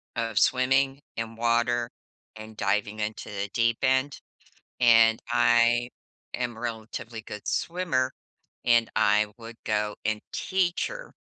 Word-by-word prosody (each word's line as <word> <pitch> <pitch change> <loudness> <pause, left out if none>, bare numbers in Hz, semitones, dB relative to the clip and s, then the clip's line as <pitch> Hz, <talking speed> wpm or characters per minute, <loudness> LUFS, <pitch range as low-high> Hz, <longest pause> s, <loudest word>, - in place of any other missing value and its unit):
of 115 -2 0
swimming 135 +2 +2 0.2
in 115 0 -4
water 120 +1 +1 0.5
and 110 0 -11
diving 105 +1 0
into 105 +1 -4
the 100 -1 -4
deep 115 -1 +2
end. 130 +2 +1 0.6
And 115 -2 +6
I 120 0 +4 0.5
am 120 -2 -3
relatively 115 0 -6
good 105 -1 -9
swimmer, 150 -8 0 0.5
and 120 -1 +4
I 105 -1 +3
would 115 0 -10
go 105 -1 -1
and 110 -1 0
teach 185 -2 0
her. - - -9
115 Hz, 125 wpm, -27 LUFS, 110-125 Hz, 0.6 s, And